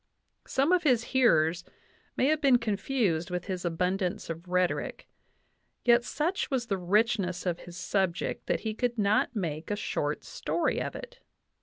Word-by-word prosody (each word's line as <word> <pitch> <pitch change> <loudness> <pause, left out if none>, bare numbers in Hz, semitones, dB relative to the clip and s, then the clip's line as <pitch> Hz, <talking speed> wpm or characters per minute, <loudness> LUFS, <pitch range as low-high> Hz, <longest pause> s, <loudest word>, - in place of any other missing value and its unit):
Some 275 +5 +2
of 365 -1 +4
his 250 -8 +3
hearers 170 -9 +4 0.5
may - - +3
have 310 +2 +2
been 270 -4 +6
confused 205 -6 0
with 180 -1 -3
his 185 -3 -4
abundance 180 +1 -1
of 165 +2 -8
rhetoric; 180 0 -1 0.8
yet 240 0 +5
such 320 +10 -1
was 260 -4 0
the 200 -4 -1
richness 190 -1 +1
of 175 -2 -1
his 175 0 -10
subject 190 -4 -1
that - - 0
he 220 -1 -2
could 240 +1 -1
not 210 +3 +2
make 160 -6 -3
a 205 - 0
short 150 -7 -2
story - - -1
of - - -4
it. - - -9
200 Hz, 160 wpm, -29 LUFS, 175-245 Hz, 0.8 s, been